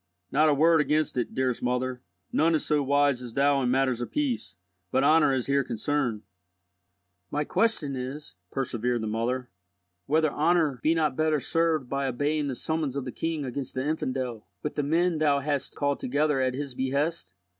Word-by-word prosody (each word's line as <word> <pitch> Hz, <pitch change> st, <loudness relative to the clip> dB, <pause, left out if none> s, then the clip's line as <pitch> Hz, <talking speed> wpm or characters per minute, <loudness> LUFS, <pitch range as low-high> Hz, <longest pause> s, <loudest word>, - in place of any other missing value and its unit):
Not 155 Hz, +3 st, +4 dB
a -, -, +4 dB
word 160 Hz, +2 st, +5 dB
against 150 Hz, 0 st, +1 dB
it, 125 Hz, -, -2 dB
dearest 130 Hz, -2 st, 0 dB
mother. 125 Hz, 0 st, -1 dB, 0.3 s
None 165 Hz, +1 st, +3 dB
is 155 Hz, -, -1 dB
so 150 Hz, -1 st, +2 dB
wise 140 Hz, -1 st, +2 dB
as 120 Hz, -2 st, -8 dB
thou 140 Hz, 0 st, +3 dB
in 125 Hz, -, +1 dB
matters 130 Hz, -1 st, +1 dB
of 120 Hz, -, -4 dB
peace, 260 Hz, -, -2 dB, 0.3 s
but 130 Hz, -, +2 dB
honour 155 Hz, 0 st, +5 dB
is 130 Hz, -2 st, 0 dB
here 140 Hz, 0 st, +2 dB
concerned." 120 Hz, -1 st, -1 dB, 1.1 s
"My 150 Hz, -, -1 dB
question 160 Hz, -7 st, 0 dB
is," 130 Hz, +4 st, -6 dB, 0.2 s
persevered 120 Hz, -2 st, -1 dB
the -, -, -3 dB
mother, 120 Hz, +3 st, -2 dB, 0.6 s
"whether 155 Hz, +1 st, +2 dB
honour 155 Hz, -4 st, +2 dB
be 160 Hz, +2 st, +3 dB
not 155 Hz, -4 st, +1 dB
better 155 Hz, 0 st, +2 dB
served 165 Hz, -2 st, 0 dB
by 140 Hz, +1 st, -1 dB
obeying 145 Hz, +4 st, 0 dB
the 135 Hz, -, -3 dB
summons 155 Hz, -1 st, -2 dB
of 140 Hz, -2 st, -3 dB
the 125 Hz, -, -4 dB
king 160 Hz, -1 st, -3 dB
against 130 Hz, +1 st, -5 dB
the 130 Hz, +1 st, -1 dB
infidel, 130 Hz, -7 st, -3 dB, 0.2 s
with 150 Hz, -, -2 dB
the -, -, -1 dB
men 165 Hz, +3 st, +1 dB
thou 145 Hz, -2 st, +3 dB
hast 145 Hz, 0 st, -2 dB
called 140 Hz, -1 st, 0 dB
together 145 Hz, +1 st, +1 dB
at 130 Hz, -1 st, 0 dB
his 140 Hz, -1 st, -4 dB
behest? 140 Hz, -, -1 dB
140 Hz, 185 wpm, -27 LUFS, 130-155 Hz, 1.1 s, word